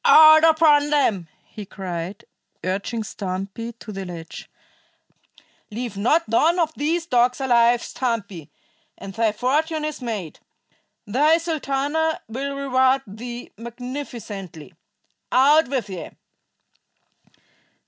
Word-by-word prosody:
"Out 315 0 +8
upon 310 -2 +5
them!" 225 - +1 0.2
he 210 - -9
cried, 185 -1 -6 0.4
urging 200 +5 -2
Stumpy 200 +3 -5
to 230 -1 -11
the 195 -1 -5
ledge. 170 -3 -9 1.2
"Leave 230 0 -5
not 275 +12 +2
one 310 +10 +3
of 320 -3 +1
these 325 +3 -1
dogs 250 -3 +2
alive, 240 -2 +3
Stumpy, 205 - -4 0.5
and 195 - -9
thy 225 0 +1
fortune 300 +7 0
is 305 -3 -5
made. 210 -10 -5 0.7
Thy 295 +10 +3
Sultana 315 -1 -1
will 275 +5 -4
reward 265 -1 +2
thee 235 +4 -8
magnificently. 230 - -8 0.6
Out 290 +5 +5
with 255 -5 -2
ye!" 185 -3 -7
245 Hz, 105 wpm, -22 LUFS, 205-290 Hz, 1.2 s, Out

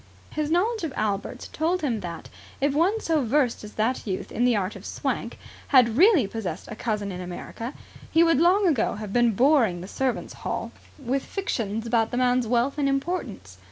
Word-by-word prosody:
His 305 -1 -2
knowledge 410 +6 +1
of 310 -5 -3
Albert 210 +4 -2
told 340 +4 0
him 240 -7 0
that, 170 -4 -7 0.3
if 280 0 +1
one 360 +9 +2
so 320 -8 +1
versed 250 0 +1
as 210 - -9
that 225 +2 -1
youth 190 -2 -3
in 240 - +1
the 245 -2 +4
art 200 -1 -1
of - - -10
Swank - - -3 0.3
had 245 -4 +5
really 350 - +6
possessed 195 -5 -5
a 215 - -6
cousin 210 -3 -2
in 180 0 -6
America, 205 +7 -7 0.3
he 330 +1 +5
would 330 -3 +3
long 375 +4 +4
ago 300 -10 +2
have 210 -1 -6
been 240 -2 +3
boring 235 - +3
the 185 - -7
servants' 260 +4 -2
hall - - -3 0.3
with 270 -1 -1
fictions 225 - -3
about 225 -1 +2
the 245 - -3
man's 250 -1 +2
wealth 245 +5 +1
and 280 -1 +2
importance. 275 - -3
245 Hz, 195 wpm, -25 LUFS, 215-300 Hz, 0.3 s, really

